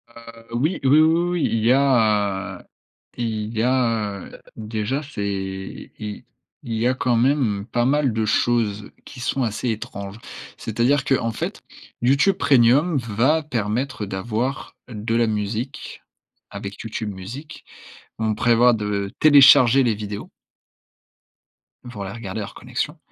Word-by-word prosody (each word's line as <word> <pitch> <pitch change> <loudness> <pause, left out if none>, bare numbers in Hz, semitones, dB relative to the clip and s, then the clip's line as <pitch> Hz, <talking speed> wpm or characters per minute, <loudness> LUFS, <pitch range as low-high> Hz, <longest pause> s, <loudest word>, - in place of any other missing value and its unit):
Heu, 115 0 -13
oui, 150 +10 0
oui, 135 - +3
oui, 150 +3 +6
oui, 160 +2 +4
oui, 175 -2 0
il 110 -1 0
y 120 - +5
a, 105 -8 +1
heu - - -19 0.5
il 110 -1 -3
y - - +2
a, 115 -5 0
heu - - -13
déjà 110 +5 -3
c'est 95 -7 -5
il 105 -1 -6 0.4
il 115 - -5
y 110 +2 +1
a 130 - +2
quand 125 -1 +1
même 120 -6 +1
pas 120 -1 0
mal 140 -2 +2
de 110 0 0
choses 110 -2 0 0.2
qui 130 - -11
sont 130 +1 -1
assez 115 +2 -2
étranges. 100 -2 -5 0.4
C'est-à-dire 120 +6 0
qu'en 115 -4 +1
fait, - - -5 0.4
YouTube 140 +10 +3
Premium 145 +1 +4
va 125 +7 +1
permettre 120 -2 -2
d'avoir 110 +7 -3
de 115 0 -3
la 115 0 +3
musique 110 +7 -4 0.5
avec 100 0 -7
YouTube 110 -2 -5
Music. 115 +11 -9 0.6
On 110 -1 0
prévoit 120 +2 +4
de 105 -2 -2
télécharger 135 -3 +7
les 120 -3 +2
vidéos 105 -1 -6 1.6
pour 105 -4 -6
les 95 - -6
regarder 110 -2 -6
hors 100 - -7
connexion - - -4
115 Hz, 145 wpm, -22 LUFS, 105-130 Hz, 1.6 s, télécharger